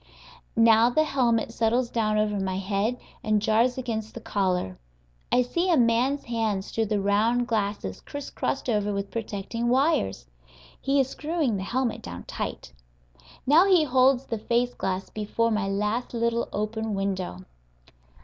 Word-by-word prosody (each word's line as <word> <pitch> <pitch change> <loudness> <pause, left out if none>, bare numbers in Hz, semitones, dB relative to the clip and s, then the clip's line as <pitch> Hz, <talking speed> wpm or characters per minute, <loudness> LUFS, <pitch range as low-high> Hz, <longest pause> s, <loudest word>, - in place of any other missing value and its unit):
Now 230 +1 +6
the 310 +6 +3
helmet 240 -6 +1
settles 235 +2 +1
down 215 -2 +1
over 210 -1 +1
my 190 -1 -2
head 200 +5 -1 0.3
and 215 -2 +2
jars 225 +4 +2
against 220 -4 -4
the - - -5
collar. 185 - -1 0.5
I 250 - +4
see 340 +9 -1
a 335 - +4
man's 245 +4 +2
hands 220 -5 -2
through 225 -1 0
the 210 -1 0
round 215 +5 +2
glasses 205 - -2
crisscrossed 285 -1 -4
over 210 -3 +1
with 200 0 -4
protecting 230 +1 -3
wires; 250 - +1 0.6
he 275 +1 +2
is 265 - +3
screwing 300 -4 -1
the - - -4
helmet 245 +4 -1
down 85 0 -8
tight. - - -6 0.7
Now 320 +8 +6
he 365 -5 +5
holds 260 -1 +3
the 230 - -3
face 240 +3 0
glass 190 0 -3
before 220 +2 -1
my 215 -2 0
last 210 +5 -1
little 235 0 0
open 215 +1 -2
window. 190 - -3
225 Hz, 150 wpm, -26 LUFS, 205-250 Hz, 0.7 s, Now